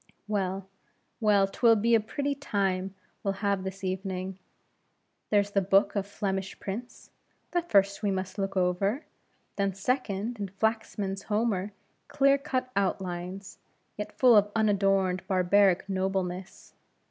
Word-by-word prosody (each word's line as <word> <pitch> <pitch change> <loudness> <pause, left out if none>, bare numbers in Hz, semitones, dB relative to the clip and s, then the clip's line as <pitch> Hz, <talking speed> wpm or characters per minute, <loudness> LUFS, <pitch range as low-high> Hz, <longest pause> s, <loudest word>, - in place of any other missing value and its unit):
well, 195 -2 -2 0.5
well; 205 -3 +4
'twill 230 +3 +4
be 230 +2 +2
a 225 - +7
pretty 280 +6 -2
time 195 -8 -1 0.3
we'll 195 -1 -1
have 200 -2 +1
this 190 0 -6
evening; 185 0 -3 0.9
there's 205 -1 +2
the 200 - +2
book 195 +2 +3
of 200 -1 -1
Flemish 195 -2 -3
prints 225 +5 -7 0.4
that 350 -1 -1
first 200 0 +3
we 205 - +1
must 190 0 -3
look 195 0 -2
over; 190 - +1 0.5
then, 195 -2 0
second, 225 0 -2
is 200 -1 -3
Flaxman's 215 -3 -1
Homer 210 -2 0 0.4
clear 275 -1 +3
cut 260 -3 -2
outlines, 190 0 -3 0.4
yet 210 - -6
full 250 -3 +6
of 205 0 +4
unadorned 195 -3 +2
barbaric 190 0 +3
nobleness. 190 -1 -3
200 Hz, 130 wpm, -28 LUFS, 190-215 Hz, 0.9 s, a